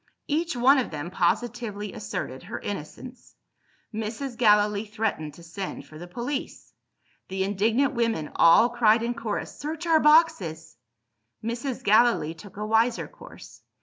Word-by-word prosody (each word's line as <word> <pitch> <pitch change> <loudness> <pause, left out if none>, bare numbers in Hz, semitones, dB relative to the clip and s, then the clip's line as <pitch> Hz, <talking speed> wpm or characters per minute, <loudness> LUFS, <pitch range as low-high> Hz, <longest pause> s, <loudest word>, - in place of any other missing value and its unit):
Each 330 +1 -1
one 265 +3 +5
of 255 - -2
them 155 +3 -6
positively 210 +2 -1
asserted 130 +4 -5
her 200 +6 -6
innocence. 205 - -8 0.6
Mrs. 225 +4 -4
Gallilee 210 -2 +3
threatened 205 -9 -3
to 170 - -14
send 175 +3 -6
for 155 - -13
the 175 - -8
police. 245 +9 -5 0.5
The 190 0 -2
indignant 220 +8 +1
women 230 - -1
all 220 +8 +6
cried 230 -1 +3
in 240 +1 -1
chorus, 225 -3 -4
"Search 315 +3 -5
our 325 -2 +4
boxes!" 195 - +3 0.7
Mrs. 240 +3 -4
Gallilee 215 -7 +4
took 195 +4 -14
a 210 - -3
wiser 225 +2 +2
course. - - -14
220 Hz, 140 wpm, -26 LUFS, 190-245 Hz, 0.7 s, all